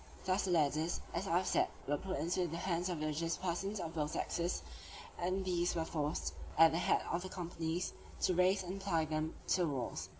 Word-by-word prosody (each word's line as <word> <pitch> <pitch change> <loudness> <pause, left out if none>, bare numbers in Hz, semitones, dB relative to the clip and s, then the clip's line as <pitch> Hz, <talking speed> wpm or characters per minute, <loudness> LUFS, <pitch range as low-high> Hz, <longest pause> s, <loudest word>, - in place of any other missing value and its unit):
Thus 185 +2 +2
the - - -1
ladders, 155 0 +2
as 175 +4 -1
I 170 - +3
have 185 - +1
said, - - +3 0.2
were 145 - 0
at 145 - -1
once 170 -2 0
put - - 0
into 175 - +2
the 165 - -4
hands 175 0 0
of 175 -3 -2
religious 155 +2 0
persons 195 +3 -2
of 165 -2 -4
both 150 -2 -1
sexes, 170 +1 -1 0.6
and 185 +2 0
these 175 -1 +1
were 165 -1 0
forced, 150 - -1 0.2
at 165 0 +8
the 165 - +1
head - - +3
of 170 - 0
the 185 - -5
companies, 170 -1 -2 0.3
to 185 - +3
raise 185 +2 +4
and 190 +2 -5
apply 165 -5 +1
them 155 +1 -2
to - - +4
the 175 - +3
walls. 135 -5 -3
170 Hz, 225 wpm, -36 LUFS, 160-185 Hz, 0.6 s, at